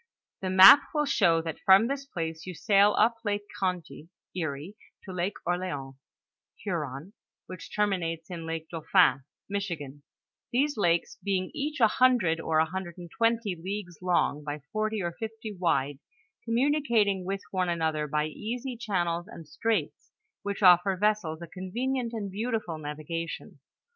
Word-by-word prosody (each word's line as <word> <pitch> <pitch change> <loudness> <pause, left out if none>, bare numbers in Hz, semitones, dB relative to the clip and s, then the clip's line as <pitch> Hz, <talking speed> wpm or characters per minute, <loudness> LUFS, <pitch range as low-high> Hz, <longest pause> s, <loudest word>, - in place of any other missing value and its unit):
The 190 - -2
map 190 +9 +10
will 300 0 +2
show 165 - +3
that 165 -1 -5
from 195 +2 +6
this 275 +2 -3
place 165 -6 -5
you 180 - -6
sail 200 +3 +4
up 230 +2 +3
Lake 205 -1 -1 0.2
Conty 180 -4 -3 0.3
(Erie), 160 +2 -4 0.3
to 190 - -8
Lake 180 +3 -2
Orleans 170 -7 -3 0.6
(Huron), 140 +10 -5 0.3
which 185 -2 -10
terminates 180 -5 -1
in 165 -2 -6
Lake 165 0 -4
Dauphin 165 -4 +3 0.2
(Michigan); 170 -9 -4 0.5
these 285 +4 +1
lakes 170 -5 0
being 190 -2 -1
each 300 -1 -3
a 225 - +6
hundred, 215 -10 +3
or 160 -1 0
a 160 - +4
hundred 175 0 -6
and 175 -2 -10
twenty 230 -4 +1
leagues 180 0 -6
long, 175 -4 +1
by 145 0 -5
forty 215 -1 -1
or 170 - -1
fifty 220 +3 -7
wide, 145 -6 0 0.5
communicating 235 -6 +2
with 195 +2 -3
one 185 -2 0
another 160 -3 -1
by 150 +1 0
easy 240 - -5
channels 175 -6 -2
and 165 -7 -11
straits, 205 +1 -2 0.3
which 200 0 -4
offer 185 +1 +6
essels 190 -5 0
a - - -7
convenient 235 +8 -3
and 210 -4 -4
beautiful 215 -6 -3
navigation. 155 +3 -6
185 Hz, 150 wpm, -28 LUFS, 165-215 Hz, 0.6 s, map